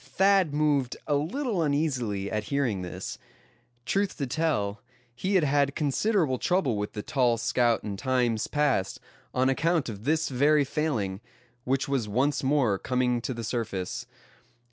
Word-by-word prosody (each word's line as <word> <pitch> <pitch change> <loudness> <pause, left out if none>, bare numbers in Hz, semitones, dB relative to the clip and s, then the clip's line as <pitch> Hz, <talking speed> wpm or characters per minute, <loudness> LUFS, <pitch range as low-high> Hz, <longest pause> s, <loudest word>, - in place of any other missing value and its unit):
Thad 195 -4 +3
moved 145 -4 +1
a 150 - 0
little 190 - -1
uneasily 130 -10 -1
at 105 -1 -2
hearing 125 -8 0
this. 90 - -6 0.7
Truth 200 0 0
to 140 - -1
tell, 125 -8 -1 0.3
he 190 +11 -1
had 180 - +4
had 140 -1 +2
considerable 155 - +1
trouble 175 - +1
with 105 0 -3
the 105 - -5
tall 125 -4 +2
scout 120 0 +1
in 100 -2 -4
times 120 -1 0
past, 140 -10 0 0.3
on 130 +1 +2
account 160 +2 +1
of 105 -2 -7
this 155 +4 +1
very 145 +3 +3
failing, 120 -10 -2 0.4
which 135 +3 0
was 130 -6 -1
once 135 +7 +1
more 130 -8 +2
coming 125 -1 0
to 130 - -3
the 115 - -5
surface. 110 -5 -3
135 Hz, 150 wpm, -27 LUFS, 115-150 Hz, 0.7 s, had